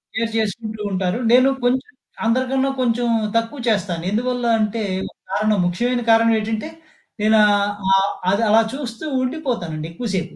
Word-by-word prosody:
Share 225 Hz, 0 st, -1 dB
చేసుకుంటూ 220 Hz, 0 st, -3 dB
ఉంటారు. 185 Hz, +2 st, -1 dB
నేను 255 Hz, +2 st, +6 dB
కొంచెం 255 Hz, +2 st, 0 dB, 0.3 s
అందరికన్నా 260 Hz, +3 st, +1 dB
కొంచెం 240 Hz, 0 st, +1 dB, 0.3 s
తక్కువ 230 Hz, +4 st, -1 dB
చేస్తాను. 185 Hz, -6 st, 0 dB
ఎందువల్ల 245 Hz, +2 st, -1 dB
అంటే 215 Hz, +1 st, -1 dB, 0.5 s
కారణం 215 Hz, -2 st, +1 dB
ముఖ్యమైన 240 Hz, +8 st, 0 dB
కారణం 225 Hz, 0 st, +5 dB
ఏటంటే 220 Hz, +5 st, -3 dB, 0.5 s
నేను 215 Hz, +1 st, +4 dB
ఆహ్, 205 Hz, 0 st, +2 dB, 0.3 s
ఆహ్, 195 Hz, -, +1 dB, 0.2 s
అది 200 Hz, +3 st, +1 dB
అలా 225 Hz, +1 st, +6 dB
చూస్తూ 255 Hz, -1 st, -6 dB, 0.2 s
ఉండిపోతానండి 235 Hz, -, -3 dB
ఎక్కువ 230 Hz, +8 st, -5 dB
సేపు 175 Hz, -1 st, -3 dB
225 Hz, 140 wpm, -20 LUFS, 205-245 Hz, 0.5 s, నేను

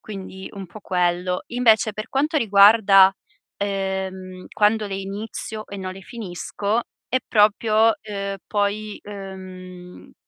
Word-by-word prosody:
quindi 190 Hz, -2 st, -8 dB
un 195 Hz, -2 st, -8 dB
po' 215 Hz, +5 st, -12 dB
quello. 180 Hz, 0 st, 0 dB
Invece 225 Hz, -3 st, +3 dB
per 215 Hz, +3 st, -6 dB
quanto 300 Hz, +4 st, 0 dB
riguarda, 200 Hz, -3 st, +6 dB, 0.4 s
ehm, 190 Hz, -2 st, -4 dB
quando 210 Hz, 0 st, +2 dB
le 195 Hz, -, -4 dB
inizio 210 Hz, +2 st, -6 dB
e 200 Hz, -, -7 dB
non 185 Hz, -1 st, -5 dB
le 195 Hz, 0 st, -11 dB
finisco, 210 Hz, +1 st, -3 dB, 0.3 s
è 255 Hz, +1 st, +1 dB
proprio, 215 Hz, +1 st, +4 dB
ehm, 200 Hz, -2 st, -4 dB
poi, 210 Hz, 0 st, -2 dB
ehm 185 Hz, -2 st, -10 dB
200 Hz, 125 wpm, -22 LUFS, 190-215 Hz, 0.4 s, riguarda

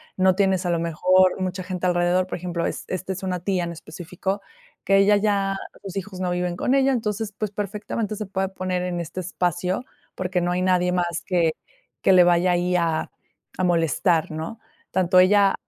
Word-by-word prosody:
no 185 Hz, 0 st, +4 dB
tienes, 190 Hz, -1 st, +1 dB
a -, -, 0 dB
lo 170 Hz, -1 st, +1 dB
mejor, 185 Hz, +3 st, +3 dB
mucha 185 Hz, 0 st, -2 dB
gente 185 Hz, 0 st, -4 dB
alrededor. 175 Hz, +1 st, +2 dB
Por -, -, -4 dB
ejemplo, 175 Hz, -1 st, -3 dB
es -, -, -4 dB
esta 185 Hz, +1 st, -4 dB
es 190 Hz, -, -8 dB
una 180 Hz, -2 st, -2 dB
tía 185 Hz, -2 st, 0 dB
en 170 Hz, -, -5 dB
específico, 180 Hz, +5 st, -5 dB, 0.4 s
que 195 Hz, -, +4 dB
ella 200 Hz, +1 st, +5 dB
ya, 200 Hz, -2 st, +1 dB, 0.3 s
sus 195 Hz, -1 st, -6 dB
hijos 190 Hz, -1 st, -6 dB
no 180 Hz, -1 st, 0 dB
viven 180 Hz, 0 st, -1 dB
con 250 Hz, +9 st, +1 dB
ella. 270 Hz, 0 st, +3 dB
Entonces, 215 Hz, -2 st, -2 dB
pues, 215 Hz, -2 st, -2 dB
perfectamente 210 Hz, +1 st, -3 dB
se 215 Hz, 0 st, -4 dB
puede 190 Hz, 0 st, -2 dB
poner 185 Hz, -1 st, -2 dB
en 175 Hz, -1 st, -2 dB
este 170 Hz, +2 st, -6 dB
espacio, 180 Hz, +2 st, -1 dB, 0.3 s
porque 185 Hz, 0 st, -1 dB
no 175 Hz, 0 st, 0 dB
hay 180 Hz, -, 0 dB
nadie 180 Hz, -1 st, +2 dB
más 175 Hz, -2 st, -1 dB
que 170 Hz, -3 st, +2 dB, 0.5 s
que 190 Hz, -, +5 dB
le 180 Hz, -1 st, +8 dB
vaya 175 Hz, +1 st, +3 dB
ahí 180 Hz, +1 st, +1 dB
a 165 Hz, -2 st, 0 dB, 0.5 s
a -, -, +1 dB
molestar, 165 Hz, 0 st, +2 dB
¿no?, 160 Hz, +8 st, -6 dB, 0.3 s
tanto 185 Hz, 0 st, +3 dB
ella 195 Hz, +1 st, +5 dB
185 Hz, 195 wpm, -23 LUFS, 175-195 Hz, 0.5 s, le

